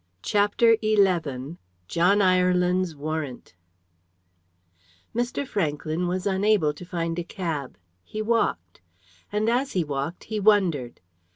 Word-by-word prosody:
CHAPTER 210 +3 +3
XI 215 -2 +4 0.8
JOHN 180 - +3
IRELAND'S 180 -1 +2
WARRANT 150 -5 -5 1.6
Mr. 240 +4 -1
Franklyn 160 -2 -1
was 180 +1 -2
unable 195 -5 +2
to 150 - -11
find 170 -1 -3
a - - -2
cab. 165 -7 -4 0.3
He 215 - -7
walked. 210 - -1 0.5
And 210 +1 0
as 255 +4 +1
he 180 - +1
walked 145 +3 -4
he 215 0 -4
wondered. 185 - +2
180 Hz, 110 wpm, -25 LUFS, 155-210 Hz, 1.6 s, XI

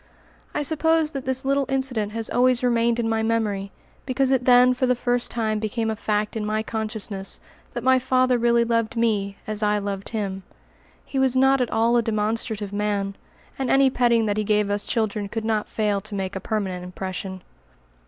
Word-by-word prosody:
I 295 - 0
suppose 320 +1 +2
that 275 -3 -5
this 260 +1 0
little 275 0 +1
incident 260 -6 0
has 225 -1 0
always 250 0 +2
remained 235 -1 +2
in 230 - 0
my 225 0 0
memory 215 -3 -1 0.4
because 265 0 +1
it 255 -2 +1
then 250 0 +6
for 255 +1 0
the 250 - +3
first 245 0 0
time 220 -2 -1
became 220 +1 -2
a - - -2
fact 210 0 -1
in 220 - -2
my 215 +1 -1
consciousness 215 -3 -3 0.4
that 240 - -3
my 260 0 +4
father 255 -1 +2
really 235 0 +3
loved 230 0 0
me 205 -4 0
as 215 0 -4
I 210 0 +2
loved 200 -1 -4
him. 200 -4 -3 0.6
He 270 - -3
was 265 -1 +3
not 270 0 +4
at 245 - 0
all 230 +2 +2
a - - +4
demonstrative 215 -1 -2
man, 205 -1 -1 0.4
and 265 -2 -1
any 270 -1 +4
petting 235 -3 +2
that 205 -1 -1
he 215 - +1
gave 210 -1 +1
us 205 0 -2
children 215 -3 -1
could 225 +1 -4
not 220 -1 -1
fail 210 -2 0
to 210 +1 -8
make 195 0 -3
a - - -2
permanent 190 -3 -3
impression. 185 +1 -6
225 Hz, 195 wpm, -23 LUFS, 210-250 Hz, 0.6 s, then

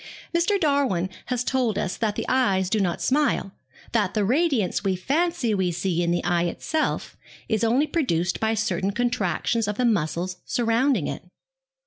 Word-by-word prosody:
Mr. 350 +4 +2
Darwin 275 - +1 0.2
has 250 -1 -1
told 245 -5 0
us 185 - -1
that 215 -3 -1
the - - -3
eyes 195 -8 +2
do 220 - +2
not 180 -4 -1
smile, 275 -8 +1 0.4
that 210 -4 0
the 210 -2 +2
radiance 260 - +1
we 195 -2 +1
fancy 280 - 0
we 190 -3 +1
see 175 0 -1
in 170 - 0
the 175 0 0
eye 175 0 +1
itself 310 - -2 0.3
is 220 0 0
only 245 +6 +3
produced 180 - 0
by 220 0 +1
certain 195 -3 0
contractions 230 -1 0
of 210 0 -2
the 250 - +1
muscles 180 -3 0
surrounding 240 - +1
it. - - -5
220 Hz, 165 wpm, -24 LUFS, 185-260 Hz, 0.4 s, only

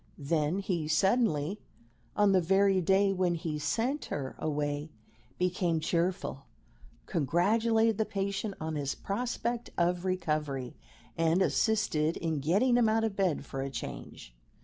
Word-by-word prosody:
Then 150 +3 0
he 180 -6 -2
suddenly, 190 - +2 0.6
on 205 -1 +4
the 190 -1 +4
very 195 +2 +3
day 195 +3 +3
when 180 -2 +1
he 160 -3 -3
sent 235 - -1
her 135 -2 -4
away, 145 0 -2 0.5
became 180 -2 0
cheerful, 170 -3 -1 0.6
congratulated 220 - +2
the 220 - +2
patient 200 +1 -3
on 160 0 -3
his 140 -2 -2
prospect 240 +2 -3
of 175 0 +1
recovery, 150 -8 -2 0.4
and 165 +3 +2
assisted 170 -10 +1
in 160 -3 -2
getting 205 - +3
him 230 -3 +4
out 225 +1 +2
of 220 -3 -1
bed 185 -7 0
for 135 - -5
a 135 - -3
change. - - -8
180 Hz, 135 wpm, -30 LUFS, 155-200 Hz, 0.6 s, on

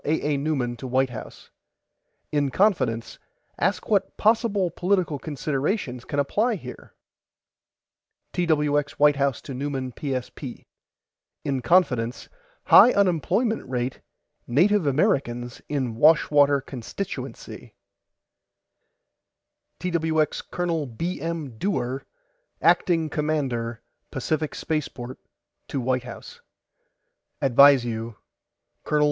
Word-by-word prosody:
A. 150 0 0
A. - - +1
NEUMAN 135 -5 -1
TO 130 - -7
WHITE 130 +1 +1
HOUSE: 115 - -10 0.8
IN 145 -2 +1
CONFIDENCE 130 - +1 0.4
ASK 185 +6 0
WHAT 200 -3 +1
POSSIBLE 210 -4 +2
POLITICAL 180 -4 0
CONSIDERATIONS 140 - -2
CAN 145 - -4
APPLY 215 - +1
HERE 125 -6 -11 1.4
TWX 150 -4 +1
WHITE 145 -1 +5
HOUSE 140 -3 0
TO 135 - -7
NEUMAN 135 -1 -3
PSP: 130 -1 -5 0.8
IN 135 -2 -1
CONFIDENCE 125 -5 +1 0.3
HIGH 250 - +8
UNEMPLOYMENT 200 - +1
RATE 125 0 -3 0.5
NATIVE 175 +7 +3
AMERICANS 130 - 0
IN 130 -5 -1
WASHWATER 145 +1 +4
CONSTITUENCY 135 - -7 2.0
TWX 160 -3 0
COL. 170 -4 -1
B. 165 +9 -4
M. 155 -8 -4
DEWAR 135 -9 -2 0.5
ACTING 165 -3 +3
COMMANDER 135 -7 -2 0.3
PACIFIC 155 +3 -2
SPACEPORT 130 -5 -4 0.5
TO 140 - -3
WHITE 130 0 -1
HOUSE: 480 - -10 1.0
ADVISE 135 -1 +6
YOU 115 -1 -4 0.7
COL. 150 - +1
145 Hz, 95 wpm, -25 LUFS, 130-170 Hz, 2.0 s, HIGH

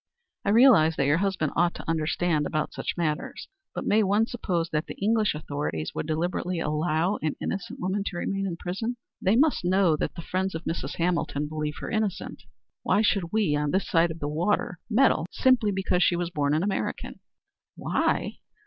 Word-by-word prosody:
"I - - 0
realize 210 -9 +6
that 140 - +1
your 150 +4 +3
husband 190 -6 0
ought 175 0 +2
to - - -9
understand 160 -1 0
about 155 0 -2
such - - -4
matters, 155 -3 -2 0.3
but - - -4
may 215 +1 +4
one 205 +2 +3
suppose 180 -8 -2
that 155 0 -1
the - - -7
English 215 -2 +1
authorities 145 - -3
would - - -4
deliberately 175 +2 -1
allow 160 +5 0
an 155 -1 -1
innocent 195 -3 -4
woman 190 +3 -1
to 175 - -4
remain 195 +2 -2
in 170 -3 -4
prison? 225 +8 -3 0.2
They 195 +3 +3
must 290 -4 +3
know 180 -2 +3
that - - -3
the 170 - -7
friends 190 0 -2
of 160 - -5
Mrs. 165 - -3
Hamilton 165 -4 -1
believe 150 0 -3
her - - -5
innocent. 215 -4 -2 0.4
Why 210 - +2
should 195 -5 +1
we 210 -9 +2
on 150 0 0
this 190 +6 0
side 170 0 +3
of 160 - -6
the 145 - -3
water 175 +3 -1
meddle 235 -7 +3
simply 255 -5 +3
because 190 -2 0
she 175 - +4
was 175 0 -2
born 145 -2 +1
an 160 - +1
American?" 200 0 -3 0.6
"Why?" - - -1
175 Hz, 190 wpm, -26 LUFS, 155-200 Hz, 0.6 s, realize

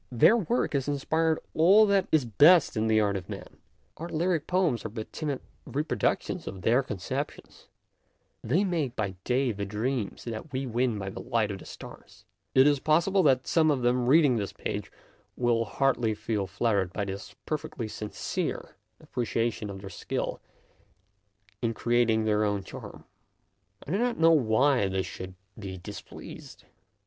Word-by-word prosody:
Their 125 - +6
work 235 -1 0
has 140 -1 0
inspired 160 +3 +1 0.2
all 195 +7 +6
that 200 -2 +2
132 140 -5 +2
MONOLOGUES 170 0 +9
is - - -7
best - - -16
in 110 0 +1
the 110 -1 +4
art 100 -2 +1
of 95 -3 -5
man; - - -8 0.4
our 170 +2 -6
lyric 165 -1 0
poems 180 -10 +1
are 110 - -4
but 110 0 -7
timid 145 -4 -3 0.3
reproductions 150 +3 -1
of 95 -1 -7
their 120 +4 +4
concep 105 -8 -3
tions; - - -17 0.8
they 160 - +2
make 160 -10 -1
by 100 -4 -2
day 130 0 +1
the 100 -1 -4
dreams 105 +2 -3
that 115 +6 -6
we 130 +1 -2
win 120 -1 0
by 95 -1 -4
the - - -8
light 115 -4 0
of 95 - -6
the - - -12
stars. - - -12 0.3
It 130 0 +7
is 145 -1 +4
pos 155 +4 +3
sible 195 -1 +3
that 130 -3 +4
some 160 -2 +3
of 135 -4 +1
them 120 0 +2
reading 140 -3 +5
this 100 -3 -3
page - - -5 0.5
will 120 -2 +2
hardly 120 -3 +1
feel 105 -2 -2
flattered 100 -2 0
by 100 - -2
this 95 0 -7
perfectly 155 -5 -4
sincere 105 -3 -4 0.2
appreciation 120 -6 -2
of 95 -1 -7
their 95 -1 -8
skill - - -3 1.2
in 115 -2 -1
creat 120 +1 +2
ing 110 -1 +2
their 105 0 +2
own 100 -2 0
charm. - - -10 0.8
I - - -6
do 195 - +1
not 245 0 0
know 165 0 +6
why 130 -4 +3
they 95 0 -1
should 95 0 -8 0.2
be 95 -3 -6
displeased. 90 - -10
120 Hz, 175 wpm, -28 LUFS, 105-155 Hz, 1.2 s, MONOLOGUES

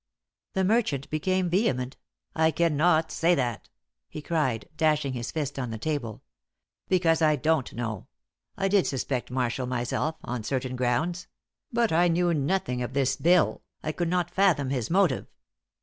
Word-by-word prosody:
The 190 - +1
merchant 190 - +1
became 185 +4 0
vehement. 130 - 0 0.4
"I 160 0 +4
cannot 160 0 +2
say 175 +2 +3
that!" 120 -6 -2 0.4
he - - -7
cried, 145 -8 -1
dashing 150 -3 +1
his 120 -1 -4
fist 145 -3 -3
on 125 -3 -3
the 110 - -4
table. 120 -3 -3 0.7
"Because 170 -3 +3
I 155 -1 +4
don't 155 -1 0
know. 115 -4 -4 0.5
I 195 - +1
did 195 -1 +3
suspect 130 -1 -2
Marshall 125 0 -1
myself 125 +5 -1
on 120 -2 -4
certain 130 +1 -2
grounds; 150 +9 -1 0.4
but 235 -1 +1
I 175 +2 +4
knew 175 0 +2
nothing 140 -4 0
of 125 +1 -4
this 135 -1 +1
bill 175 +1 +3 0.2
I 155 - -1
could 170 +1 -2
not 175 -1 0
fathom 175 -9 +2
his 125 -5 -2
motive. 180 -8 +2
155 Hz, 155 wpm, -27 LUFS, 125-175 Hz, 0.7 s, I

